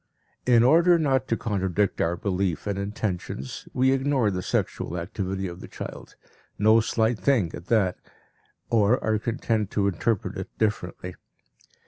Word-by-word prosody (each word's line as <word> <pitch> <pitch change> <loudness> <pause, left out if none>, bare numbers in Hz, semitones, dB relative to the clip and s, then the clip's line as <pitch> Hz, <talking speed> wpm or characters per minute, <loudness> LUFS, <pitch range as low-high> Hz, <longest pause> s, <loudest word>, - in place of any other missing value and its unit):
In 120 -2 +6
order 170 +6 +6
not 135 -5 +1
to 115 - 0
contradict 100 -3 0
our 85 +1 +1
belief 95 -3 -1
and 100 -1 -2
intentions, 100 - -4
we 130 +1 +3
ignore 135 -5 +2
the 90 -1 -2
sexual 90 -1 -2
activity 95 +1 -3
of 85 0 -8
the - - -8
child - - -9 0.4
no 110 +2 +5
slight 110 0 +1
thing, 115 -12 +2
at 85 - -9
that 100 -6 +2 0.7
or 115 +2 +4
are 110 -1 +1
content 115 -3 -1
to 100 -1 +1
interpret 100 +3 -1
it - - -6
differently. 90 -4 -2
105 Hz, 145 wpm, -25 LUFS, 95-120 Hz, 0.7 s, In